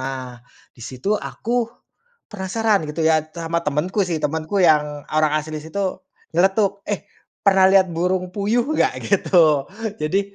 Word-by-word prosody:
Nah, 130 -2 -6 0.3
di - - -20
situ 130 - -3
aku 235 +2 -2 0.6
penasaran 205 -1 0
gitu 155 +2 -2
ya, 160 0 +4
sama 165 +1 -3
temenku 150 +8 -1
sih. 170 - -1
Temenku 160 +5 -2
yang 150 -2 +2
orang 155 0 +2
asli 155 0 -4
situ 185 +5 -3 0.3
nyeletuk, 195 +3 +2
"Eh, 205 -2 -2 0.4
pernah 190 -1 +5
lihat 190 -1 +5
burung 180 +2 0
puyuh 215 +4 +1
gak?" - - +1
Gitu. 190 -3 +4 0.6
Jadi, 155 +6 +1
170 Hz, 140 wpm, -21 LUFS, 155-195 Hz, 0.6 s, pernah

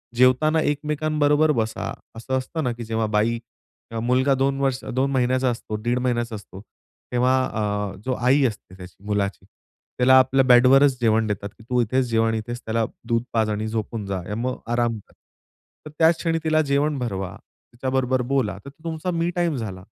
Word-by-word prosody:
जेवताना 130 +6 +4
एकमेकांबरोबर 150 +1 +1
बसा. 110 -5 -2 0.2
असं 130 +4 -2
असतं 155 +5 -3
ना 125 - 0
की 120 0 -7
जेव्हा 110 0 -1
बाई, 115 +2 +2 0.5
अ 115 - -3
मुलगा 130 +4 +2
2 135 +1 0
वर्ष 135 -2 0
2 135 +2 +1
महिन्याचा 130 0 +1
असतो, 115 -2 -4
दीड 120 +3 -1
महिन्याचा 120 -2 -1
असतो, 100 -1 -10 0.5
तेव्हा 125 +1 +3 0.6
अ, - - -11
जो 130 - 0
आई 130 +3 +3
असते 100 -5 -4
त्याची 90 0 -13
मुलाची, 100 -1 -2 0.5
त्याला 130 +1 +5
आपल्या 130 +1 +3
बेड 125 0 +6
वरच 135 0 +5
जेवण 110 -1 +3
देतात 100 -1 -3
की 115 - -16
तू 125 -1 +2
इथेच 130 +3 +1
जेव 115 0 +2
आणि 115 0 0
इथेच 120 +2 -5
त्याला 110 0 0 0.2
दूध 115 -1 +1
पाज 110 -1 +2
आणि 105 +1 -2
झोपून 110 -1 -3
जा 100 -1 -2
आणि 95 +4 -6
मग 130 +1 -2
आराम 120 -2 +1
कर. - - -23 0.7
तर - - -7
त्याच 160 0 +5
क्षणी 165 -1 -1
तिला 155 0 +3
जेवण 145 0 +1
भरवा, 95 -6 -4 0.4
तिच्याबरोबर 130 0 0
बोला 115 -8 0
तर 140 - -7
तो 155 +3 -22
तुमचा 165 +2 -3
मी 170 0 0
टाईम 175 -3 +1
झाला. 95 -7 -5
125 Hz, 185 wpm, -23 LUFS, 110-140 Hz, 0.7 s, बेड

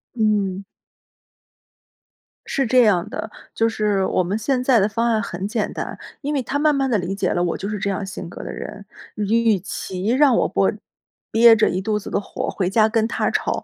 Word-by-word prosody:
嗯。 205 -4 0 1.8
是 270 - -1
这 250 +1 +5
样 185 -6 +2
的， 220 - -5 0.2
就 225 0 +1
是 210 -3 0
我 185 - +1
们 195 +5 -2
现 250 +3 0
在 250 -3 +4
的 200 - +2
方 230 +2 0
案 225 -2 +2
很 190 0 -4
简 220 -1 -2
单， - - -5 0.2
因 295 +1 -2
为 275 - 0
他 270 +4 -2
慢 300 0 +3
慢 270 -1 0
地 225 - +2
理 180 +1 -3
解 195 -2 -1
了 175 - 0
我 175 - -1
就 200 - -5
是 210 - -3
这 200 0 -2
样 195 0 -2
性 190 -2 -7
格 - - -9
的 - - -6
人， 205 -1 -8 0.3
与 220 0 +2
其 190 0 -5
让 260 +1 +4
我 - - +2
不 - - +1 0.6
憋 230 0 +7
着 215 - +3
一 185 - -1
肚 210 +1 -1
子 - - -8
的 - - 0
火， 200 - -5
回 185 -2 -1
家 215 +1 +3
跟 225 0 +1
他 - - -1
吵， - - -1
215 Hz, 230 characters per minute, -21 LUFS, 195-235 Hz, 1.8 s, 憋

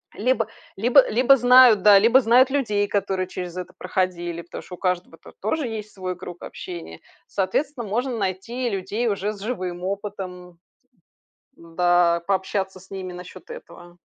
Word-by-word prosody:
Либо 230 -1 +1 0.3
либо 245 +7 +5
либо 255 +4 +4
знают, 245 -4 +7
да, 205 -2 +8
либо 235 +5 +5 0.3
людей, 210 -7 0
которые 190 -2 -1
через 180 -1 -7
это 180 - -6
проходили, 175 -2 -2
потому 170 - -9
что 180 - -12
у - - -20
каждого-то 180 -1 -3
тоже 310 -6 -1
есть 215 -2 -6
свой 185 -1 -5
круг 175 -1 -9
общения. 165 - -8 0.3
Соответственно, 235 +6 -2
можно 240 +4 -2
найти 210 +6 -3
людей 200 +5 -2
уже 205 0 -1
с 205 - -12
живым 185 -6 -4
опытом, 185 -3 -6 0.9
да, 170 -3 +1
пообщаться 190 -1 -2
с 190 - -19
ними 185 -2 -6
насчет 180 - -11
этого. 175 - -12
195 Hz, 145 wpm, -23 LUFS, 180-230 Hz, 0.9 s, да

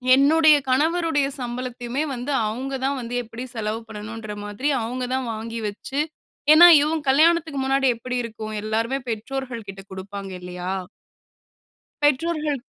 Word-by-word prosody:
என்னுடைய 305 +2 +6
கணவருடைய 310 +1 +2
சம்பளத்தையுமே 245 +2 -3
வந்து, 250 +4 -4 0.2
அவங்க 260 +5 -4
தான் 275 +1 0
வந்து 240 0 -5
எப்படி 230 +2 -8
செலவு 215 0 -2
பண்ணனும்ன்ற 215 0 -7
மாதிரி 205 +8 -3 0.2
அவங்க 250 +3 -3
தான் 260 -2 -2
வாங்கி 225 +1 -5
வச்சு 265 +7 -5 0.5
ஏன்னா 345 +3 +10
இவன் 310 +1 0
கல்யாணத்துக்கு 315 +1 +3
முன்னாடி 270 0 +2
எப்படி 250 +2 -5
இருக்கும்? 215 -2 -6
எல்லாருமே 225 +4 -1
பெற்றோர்கள் 235 +1 -4
கிட்ட 195 0 -8
குடுப்பாங்க 195 +1 -7
இல்லையா? 180 0 -5 1.3
பெற்றோர்கள் 300 0 +1
250 Hz, 125 wpm, -23 LUFS, 220-285 Hz, 1.3 s, ஏன்னா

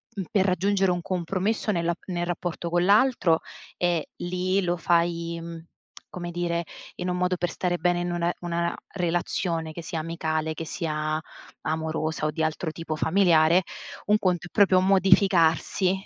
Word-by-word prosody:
uhm, 195 - -2
per 195 -2 +3
raggiungere 195 +1 +2
un 175 0 -1
compromesso 185 +6 -1
nella 170 -2 0
nel 175 -1 -2
rapporto 175 -1 -3
con 175 0 +2
l'altro, 200 -5 +4 0.4
e 175 -3 0
lì 185 +2 0
lo 175 0 0
fai, 170 0 +1
mhmm, 165 -1 -8 0.5
come 175 -1 -5
dire, 170 0 -1 0.3
in 180 +1 -3
un 180 - -1
modo 180 0 +1
per 175 -1 -1
stare 175 +1 -1
bene 175 0 +1
in 175 - -2
una 175 0 0
una 170 0 -1 0.2
relazione 170 -2 -1
che 170 +2 -7
sia 165 0 -4
amicale, 160 -1 -2
che 165 - -6
sia 155 -1 -2 0.4
amorosa 160 0 -2
o - - -1
di 160 - -2
altro 160 +1 -1
tipo 160 -1 -5
familiare, 170 0 +4 0.4
un 210 +1 +4
conto 180 -3 0
è - - -19
proprio 195 -3 +5
modificarsi, 185 -2 +3
175 Hz, 160 wpm, -26 LUFS, 165-185 Hz, 0.5 s, proprio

